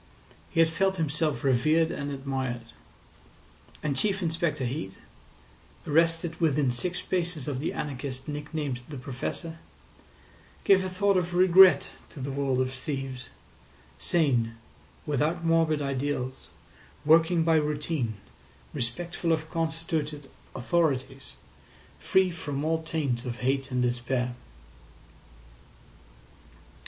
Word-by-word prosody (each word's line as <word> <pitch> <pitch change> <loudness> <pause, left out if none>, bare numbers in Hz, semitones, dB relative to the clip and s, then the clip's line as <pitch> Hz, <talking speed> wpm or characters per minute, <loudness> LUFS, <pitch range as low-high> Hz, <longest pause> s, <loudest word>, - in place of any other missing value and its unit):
He - - -2
had 165 -1 +6
felt 190 +3 +1
himself 155 -2 -1
revered 155 +5 +3
and 145 -4 -4
admired. 135 -3 -3 1.2
And 145 -2 0
Chief 195 +5 0
Inspector 160 -4 0
Heat, 120 -6 -4 0.9
arrested 165 +2 +1
within 145 -5 +3
six 175 +9 -2
paces 170 -5 -2
of 140 -3 -2
the 155 - -1
anarchist 135 -2 -5
nick 150 0 -5
named 145 -6 -2
the 145 - -6
Professor, 140 +6 -5 1.0
gave 190 -1 +5
a 185 - -2
thought 200 +1 +2
of 175 -1 -1
regret 185 +1 +7 0.2
to 150 - -11
the 135 +1 -3
world 135 -2 0
of 130 0 -1
thieves—sane, 130 -1 -3 0.5
without 155 +4 0
morbid 165 -2 +3
ideals, 135 -1 -3 0.6
working 165 +2 +5
by 165 0 +4
routine, 150 -5 -1 0.6
respectful 165 +8 -2
of 160 0 -1
constituted 160 -3 -2 0.2
authorities, 135 -2 -1 0.7
free 190 -1 +3
from 145 -4 -4
all 160 0 +1
taint 145 -7 -1
of 120 -2 -5
hate 135 +1 0
and 125 -1 0
despair. 125 0 -1
150 Hz, 110 wpm, -28 LUFS, 130-165 Hz, 1.2 s, regret